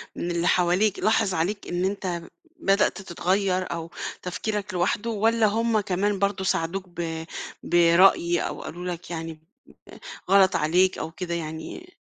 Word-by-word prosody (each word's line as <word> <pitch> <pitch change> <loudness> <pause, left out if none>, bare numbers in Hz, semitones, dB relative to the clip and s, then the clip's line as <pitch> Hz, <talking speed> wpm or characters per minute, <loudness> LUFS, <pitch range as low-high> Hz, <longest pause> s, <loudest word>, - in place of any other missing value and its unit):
من 175 - -3
اللي 170 0 0
حواليك 180 +4 +2
لاحظ 215 -2 +2
عليك 185 +5 -2
إن 175 +1 -1
أنت 190 -3 -2 0.4
بدأت 195 -5 +2
تتغيّر 185 +1 0
أو 165 0 -5 0.3
تفكيرك 205 +2 -3
لواحده 195 +5 0
والّا 225 +1 +2
هم 225 +1 +2
كمان 200 0 0
برضه 200 -1 0
ساعدوك 185 +1 -1
ب 165 -2 -5 0.4
برأي 175 0 +4
أو - - -4
قالوا 175 +2 -7
لك، 170 -1 -11
يعني 165 -1 -5 0.5
آآ - - -13 0.3
غلط 195 -1 +6
عليك 180 +5 +3
أو 160 - -4
كده، 170 +1 -5
يعني 165 - -6
185 Hz, 145 wpm, -25 LUFS, 170-200 Hz, 0.5 s, غلط